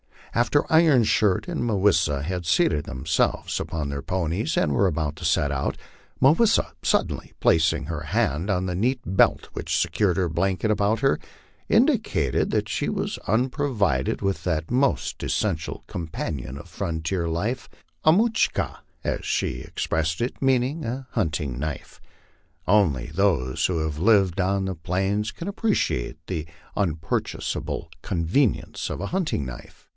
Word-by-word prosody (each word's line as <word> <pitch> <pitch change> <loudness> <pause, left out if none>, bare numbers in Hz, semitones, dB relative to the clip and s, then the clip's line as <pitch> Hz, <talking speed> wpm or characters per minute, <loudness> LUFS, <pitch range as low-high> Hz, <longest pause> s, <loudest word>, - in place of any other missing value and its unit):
After 120 +5 +3
Iron 160 -6 +6
Shirt 105 -3 +2
and - - -2
Mah 115 -3 0
wis 100 -3 +4
sa 75 -4 0
had 90 +4 -3
seatod 75 -2 +2
themselves 75 +6 0
upon 75 -3 -3
their 70 0 -3
ponies 90 +2 -1
and 75 - +2
were 100 +8 +3
about 80 -3 -2
to - - -6
set 70 - +2
out, 70 -1 -1 0.4
Mah 135 +2 +7
wis 225 +7 +4
sa, - - +1
suddenly - - 0
placing 80 0 +3
her 80 0 -4
hand 75 +4 0
on 95 -2 +1
the 90 - -2
neat 120 +7 0
belt 95 +2 +2
which - - -2
secured 95 -5 +1
her 90 -3 +1
blanket 95 +6 0
about 105 +2 +1
her, 135 0 +3 0.5
indicated - - +2
that - - 0
she - - -1
was - - -2
unprovided 110 - +1
with 95 -1 -1
that 80 -1 -1
most 130 +2 +1
essential 85 -6 -2
companion 75 -5 -5
of 85 +5 -11
frontier 85 0 -2
life, 105 +10 -2 0.4
a 155 - +8
mutcli 225 +4 +2
ka, - - -3 0.2
as - - -2
she - - -1
ex - - -4
pressed 80 +3 0
it, 120 - -3
meaning 135 +4 +1
a 130 +3 -4
hunting 75 -8 -1
knife. 75 -1 -5 0.7
Only 90 -11 +3
those 80 -9 +1
who 90 -3 0
have 80 -1 -2
lived 100 -2 +4
on 95 +1 +1
the 95 -1 -3
plains 95 +6 -1
can 170 - -6
appreciate 200 - 0
the 80 -4 -3 0.3
unpurchasable 85 -5 -2
convenience 90 - 0
of - - -4
a 100 - -2
hunting 170 - -1
knife. 65 -1 -10
90 Hz, 155 wpm, -25 LUFS, 80-115 Hz, 0.7 s, a